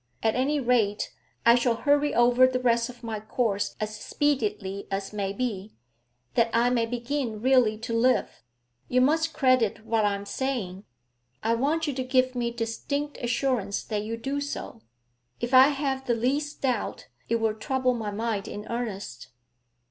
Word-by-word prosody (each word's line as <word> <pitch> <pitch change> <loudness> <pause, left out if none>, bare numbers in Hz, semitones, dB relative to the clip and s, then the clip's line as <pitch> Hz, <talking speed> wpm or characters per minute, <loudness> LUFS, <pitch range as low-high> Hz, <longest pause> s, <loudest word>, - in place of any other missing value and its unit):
At 220 - +3
any 280 +4 +1
rate, 235 -5 +1 0.3
I 235 - +8
shall 240 -1 +2
hurry 290 +4 +2
over 245 +2 +5
the 255 0 -1
rest 235 -1 +2
of 245 -1 -12
my 225 -2 -3
course 215 -1 -1
as 215 0 -3
speedily 210 -7 -1
as 195 +1 -3
may 200 -2 -2
be, 210 -2 -4 0.6
that 230 -1 +3
I 235 +2 +3
may 230 -2 +1
begin 240 -1 -3
really 245 -3 +3
to 230 +1 -5
live. 245 - +1 0.5
You 250 - +3
must 315 +5 +3
credit 255 -7 +2
what 225 -1 +1
I 205 -1 +2
am 200 0 -7
saying; 205 -5 -3 0.6
I 225 +1 +2
want 295 +7 +1
you 290 - -1
to 260 0 -2
give 255 0 +2
me 240 -1 -1
distinct 235 +6 -3
assurance 240 -5 -1
that 210 -2 -2
you 225 +2 -4
do 275 +4 -3
so. 285 - -6 0.6
If 240 +2 -3
I 260 +1 +9
have 270 -2 -2
the 240 - +2
least 280 +6 -1
doubt, 250 -5 -1 0.2
it 230 - +2
will 225 -1 +1
trouble 255 +4 0
my 225 -3 -3
mind 210 -1 -2
in 210 +1 -6
earnest.' 200 - -5
235 Hz, 170 wpm, -27 LUFS, 215-260 Hz, 0.6 s, I